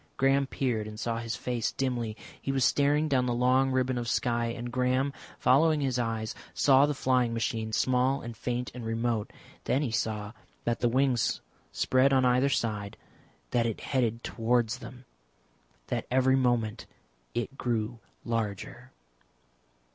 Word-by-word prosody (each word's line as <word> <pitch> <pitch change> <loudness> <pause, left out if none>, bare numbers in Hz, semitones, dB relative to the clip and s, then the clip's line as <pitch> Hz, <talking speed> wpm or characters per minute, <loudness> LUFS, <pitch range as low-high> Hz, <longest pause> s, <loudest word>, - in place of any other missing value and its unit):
Graham 135 +1 +3
peered 120 -6 -1
and 105 0 -8
saw 115 0 -2
his 115 -2 -3
face 120 -1 -2
dimly. 120 -5 -2 0.2
He 135 - -2
was 135 -1 +2
staring 145 +2 +3
down 130 -4 +2
the 120 - 0
long 130 +2 +3
ribbon 130 -1 +1
of 120 - -4
sky, 120 -1 +1
and 120 +1 -5
Graham, 130 +2 +1 0.2
following 155 +4 +4
his 130 -3 0
eyes, 115 -2 -2 0.2
saw 140 0 +5
the 150 - -1
flying 125 -3 +1
machine 110 -1 -2
small 130 +4 +2
and 120 0 -6
faint 125 +2 -3
and 125 -1 -7
remote. 115 -1 -1 0.3
Then 140 - +1
he 125 - -2
saw 105 -1 -2 0.3
that 120 0 -1
the 120 - +2
wings 130 -1 +1 0.3
spread 130 +2 +3
on 130 -1 +4
either 125 +2 +3
side, 105 -6 -2 0.5
that 115 -1 +2
it 115 - -3
headed 120 -4 0
towards 115 -1 0
them, 125 0 -11 0.8
that - - -2
every 130 +1 +4
moment 120 -4 0 0.5
it 120 +3 -2
grew 115 -2 -2 0.3
larger. 110 -5 -3
125 Hz, 155 wpm, -29 LUFS, 115-130 Hz, 0.8 s, saw